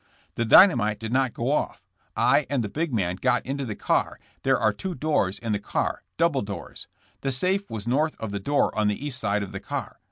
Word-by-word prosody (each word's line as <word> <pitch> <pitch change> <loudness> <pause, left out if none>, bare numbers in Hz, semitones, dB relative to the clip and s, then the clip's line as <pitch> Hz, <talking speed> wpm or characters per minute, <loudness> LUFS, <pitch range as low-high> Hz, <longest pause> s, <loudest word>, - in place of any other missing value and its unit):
*'The 115 - -1
dynamite 110 - +6
did 110 +1 -4
not 130 -1 +2
go 120 +5 -2
off. 150 - -1 0.3
I - - +3
and 135 -4 0
the 105 - -4
big 160 +6 -2
man 90 -6 -1
got 125 +3 +1
into 135 +1 -3
the 110 -4 -4
car; - - 0 0.2
there 135 -1 +3
are 110 - +2
two 180 - -5
doors 145 -13 0
in 115 -2 -4
the 105 - 0
car - - -2
— - - -53
double 165 -5 +2
doors. 100 -1 -7 0.3
The 135 - -2
safe 190 +10 0
was 110 0 -5
north 150 +6 +1
of 110 -2 -4
the 100 - -3
door 145 +8 +1
on 110 -1 +2
the 105 +7 -2
east 135 -3 -2
side 105 -2 0
of 100 - -7
the - - -5
car. - - -5
125 Hz, 230 wpm, -25 LUFS, 105-145 Hz, 0.3 s, dynamite